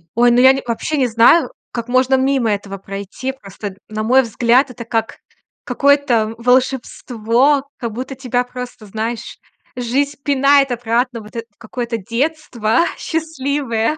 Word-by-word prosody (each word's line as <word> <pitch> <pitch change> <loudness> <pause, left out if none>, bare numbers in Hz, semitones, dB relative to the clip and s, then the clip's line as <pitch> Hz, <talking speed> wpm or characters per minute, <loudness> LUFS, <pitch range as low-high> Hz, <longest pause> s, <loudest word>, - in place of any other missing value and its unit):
Ой, 240 +1 +5
ну, 240 - +4
я 260 +1 +7
не 270 - -3
вообще 245 +6 -2
не 260 -3 +2
знаю 240 +6 +5 0.2
как 235 -1 -4
можно 255 +1 +3
мимо 260 -3 +1
этого 200 -1 -4
пройти. 200 +6 -6
Просто, 200 -5 -9
на 215 0 -4
мой 255 +4 +4
взгляд, 240 +4 +2
это 250 -1 -8
как 225 -1 -2 0.4
какое-то 275 -6 +2
волшебство, 250 +1 +1
как 235 -2 -4
будто 260 +4 -5
тебя 250 -1 -1
просто, 250 -2 -8
знаешь, 220 +3 -4 0.4
жизнь 270 +4 -1
пинает 275 -1 +3
обратно, 240 0 -1
вот 210 +1 -14
это 230 - -4
в - - -42
какое-то 235 +1 -4
детство 235 - -1 0.2
счастливое. 285 -5 -2
245 Hz, 145 wpm, -18 LUFS, 225-270 Hz, 0.4 s, я